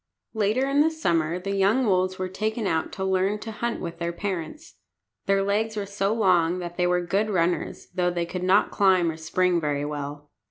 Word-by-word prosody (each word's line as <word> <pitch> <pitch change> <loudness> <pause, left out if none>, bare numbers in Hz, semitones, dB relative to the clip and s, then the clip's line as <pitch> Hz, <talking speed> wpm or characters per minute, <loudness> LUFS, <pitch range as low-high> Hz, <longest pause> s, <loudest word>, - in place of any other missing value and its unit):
Later 220 +5 +1
in 280 +1 +3
the 315 - +4
summer 170 - 0
the 190 +2 -4
young 205 +7 +3
wolves 185 -2 +1
were 185 - -2
taken 215 +4 -2
out 160 -4 0
to 190 - -3
learn 190 +2 +1
to 225 - -6
hunt 235 +2 -3
with 170 -1 -6
their 170 0 -1
parents. 195 - -5 0.5
Their 195 0 +3
legs 215 +2 0
were 205 - -2
so 200 0 -1
long 180 -6 +3
that 175 -1 -6
they 180 0 +1
were 180 0 +1
good 200 +5 0
runners, 175 -3 -1
though 180 -1 +1
they 175 -1 -1
could 180 +1 -5
not 185 +3 +3
climb 185 -4 +3
or 160 - -9
spring 175 +2 +1
very 145 -1 -1
well. 145 0 -6
185 Hz, 205 wpm, -25 LUFS, 170-205 Hz, 0.5 s, the